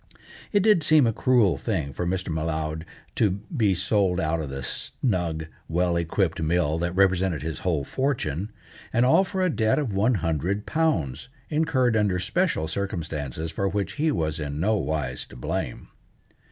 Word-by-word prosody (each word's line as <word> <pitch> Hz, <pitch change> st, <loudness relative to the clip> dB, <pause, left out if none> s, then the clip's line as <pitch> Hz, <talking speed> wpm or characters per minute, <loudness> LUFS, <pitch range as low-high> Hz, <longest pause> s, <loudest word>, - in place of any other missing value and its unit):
It 205 Hz, -2 st, +3 dB
did 210 Hz, -5 st, +5 dB
seem 155 Hz, -2 st, +5 dB
a 115 Hz, -, +2 dB
cruel 120 Hz, -6 st, +3 dB
thing 80 Hz, -, -2 dB
for 90 Hz, -, -2 dB
Mr. 95 Hz, 0 st, -2 dB
M'Leod 80 Hz, 0 st, -2 dB, 0.3 s
to 105 Hz, -, +4 dB, 0.3 s
be 105 Hz, -7 st, +3 dB
sold 95 Hz, -1 st, +1 dB
out 80 Hz, -2 st, 0 dB
of 75 Hz, -, -5 dB
the 65 Hz, -1 st, -5 dB
snug, 85 Hz, -, -2 dB, 0.2 s
well 85 Hz, +1 st, +1 dB
equipped 85 Hz, 0 st, 0 dB
mill 80 Hz, -1 st, +1 dB
that 85 Hz, +1 st, -2 dB
represented 95 Hz, -4 st, +2 dB
his 80 Hz, -3 st, -4 dB
whole 80 Hz, -6 st, 0 dB
fortune; 105 Hz, -, -2 dB, 0.4 s
and 120 Hz, +2 st, +3 dB
all 130 Hz, +9 st, +5 dB
for 190 Hz, 0 st, -2 dB
a 185 Hz, -, +3 dB
debt 110 Hz, -1 st, +2 dB
of 140 Hz, -9 st, -1 dB
one 110 Hz, +5 st, +3 dB
hundred 85 Hz, +4 st, -1 dB
pounds, 125 Hz, -, 0 dB, 0.2 s
incurred 145 Hz, -7 st, +2 dB
under 105 Hz, -4 st, +2 dB
special 150 Hz, -, 0 dB
circumstances 80 Hz, -4 st, -3 dB
for 100 Hz, +4 st, -1 dB
which 100 Hz, -1 st, -2 dB
he 160 Hz, 0 st, +3 dB
was 80 Hz, -, -1 dB
in 75 Hz, -1 st, -4 dB
no 110 Hz, +6 st, +2 dB
wise 75 Hz, -9 st, -2 dB
to -, -, -13 dB
blame. -, -, -4 dB
90 Hz, 165 wpm, -25 LUFS, 80-115 Hz, 0.4 s, did